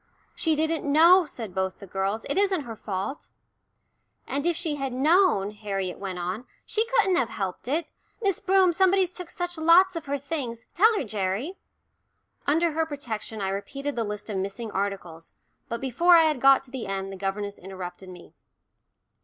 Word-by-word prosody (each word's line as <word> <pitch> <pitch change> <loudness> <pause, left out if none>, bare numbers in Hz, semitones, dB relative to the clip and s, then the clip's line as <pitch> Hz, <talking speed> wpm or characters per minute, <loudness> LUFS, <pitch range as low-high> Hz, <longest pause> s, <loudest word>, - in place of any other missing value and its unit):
"She 320 -2 +1
didn't 315 -1 0
know," 340 +3 +7
said 225 -8 -7
both 190 0 -2
the 200 - -11
girls. 195 +3 -2
"It - - -1
isn't 385 -4 +2
her 230 -4 -7
fault." 205 +8 -5 1.0
"And 285 +4 -2
if 345 - +2
she 325 -4 -1
had 270 -2 -3
known," 290 - +3
Harriet 195 -3 -4
went 190 -2 -4
on, 185 +7 -4 0.2
"she 445 +1 0
couldn't 390 -7 +3
have 240 - +1
helped 195 -1 -5
it. 310 +6 0 0.3
Miss 395 -6 0
Broom, 380 -2 +4
somebody's 375 0 +3
took 360 -1 -8
such 350 -1 -4
lots 350 +3 +5
of 330 -3 -5
her 285 +1 -1
things. 265 -5 -5
Tell 435 +6 +5
her, - - -1
Gerry." 210 - -3 0.9
Under 325 +3 +3
her 320 +1 0
protection 225 -7 -5
I 190 - -1
repeated 275 +9 -4
the 235 - 0
list 210 -1 -5
of 200 - -2
missing 200 +4 -4
articles, 190 -5 -4 0.4
but 235 -1 -3
before 270 +8 +4
I 330 - +6
had 305 -5 +1
got 270 0 +6
to 260 - -16
the 260 -6 -5
end 195 0 -3
the - - -6
governess 200 +1 -4
interrupted 185 0 -8
me. 180 -1 -13
260 Hz, 180 wpm, -26 LUFS, 195-330 Hz, 1.0 s, know